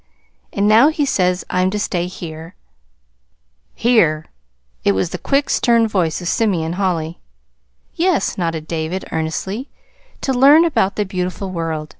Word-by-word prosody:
And 200 +1 0
now 225 +6 +6
he 305 -2 0
says 180 -7 0
I'm 185 0 +2
to 210 - -3
stay 180 -4 -1
here." 165 -2 -9 1.2
"Here!" 165 -10 +2 0.6
It 100 - +3
was 95 - -1
the 180 - -5
quick, 280 +1 +1
stern 230 -2 +3
voice 180 -7 0
of - - -4
Simeon 175 -6 0
Holly. 175 -4 -2 0.7
"Yes," 350 -2 +1
nodded 165 -3 -3
David 165 +3 -3
earnestly; 190 - -3 0.5
"to 270 - -1
learn 285 +6 +6
about 200 - +1
the 210 - -1
beautiful 185 0 -4
world. 160 -3 -3
185 Hz, 140 wpm, -18 LUFS, 165-225 Hz, 1.2 s, now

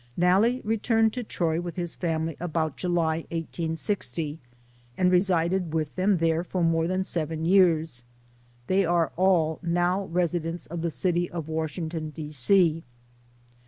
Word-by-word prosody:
Nalle 200 +8 +3
returned 225 0 +1
to 250 - -3
Troy 170 -6 -1
with 175 -1 -6
his 175 -2 -3
family 165 -2 -2
about 160 -3 -2
July, 170 -3 0
1860, 165 - -2 0.6
and 180 0 +3
resided 180 -2 +1
with 155 -2 -2
them 190 +1 +2
there 165 0 +1
for 180 0 -2
more 165 0 +2
than 185 +1 0
seven 160 -3 -2
years. 165 -7 +3 0.6
They 190 +6 +2
are 170 -2 +1
all 170 -4 +2
now 175 +2 0
residents 170 -1 -2
of 170 0 -6
the 170 - 0
city 175 +5 0
of 165 -3 -5
Washington, 160 0 -3
D. 150 0 -7
C. 165 +3 +3
170 Hz, 140 wpm, -26 LUFS, 160-185 Hz, 0.6 s, Nalle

